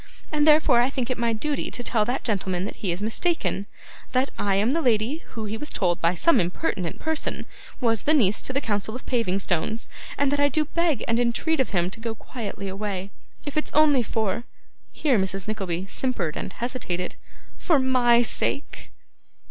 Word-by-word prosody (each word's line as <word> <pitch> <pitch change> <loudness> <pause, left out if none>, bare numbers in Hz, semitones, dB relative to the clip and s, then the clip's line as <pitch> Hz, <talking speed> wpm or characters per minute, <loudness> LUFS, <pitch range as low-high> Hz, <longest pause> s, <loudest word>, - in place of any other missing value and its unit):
And 300 0 +2
therefore 300 -5 +6
I 245 - +2
think 260 -2 -2
it 255 - -1
my 235 -1 +2
duty 285 +6 -1
to 245 - -4
tell 220 -3 +2
that 250 +4 -2
gentleman 190 -5 -1
that - - -6
he 190 - -1
is 175 +4 -3
mistaken, 225 - 0 0.5
that 260 +2 +2
I 200 -1 +1
am 210 +5 +2
the 330 +3 +1
lady 235 +2 +2 0.2
who 220 -2 -4
he 215 +1 -3
was 300 - -6
told 175 -3 0
by 170 +2 +3
some 335 - +4
impertinent 180 - -1
person 320 -1 -2 0.3
was 230 -3 0
niece 235 -10 +4
to - - -3
the 275 +2 0
Council 215 -1 -1
of 255 - -8
Paving 230 -7 +1
stones, 195 +4 -1 0.3
and 280 -1 +2
that 285 - +1
I 285 0 +4
do 310 +1 +1
beg 335 -1 0
and 230 +1 +2
entreat 245 +7 +1
of 265 - +2
him 180 -2 0
to 225 - -9
go 225 0 -3
quietly 215 -4 -6
away, 195 -1 -4 0.3
if 290 - -5
it's 305 - 0
only 295 -4 +5
for,' 220 -1 -1 0.5
here 275 -8 +2
Mrs. 190 0 -2
Nickleby 190 -4 -2
simpered 195 -7 -2
and - - -5
hesitated, 235 -8 -3 0.4
'for 320 - +3
MY 250 -2 +4
sake. 280 +4 -2
230 Hz, 190 wpm, -25 LUFS, 195-275 Hz, 0.5 s, therefore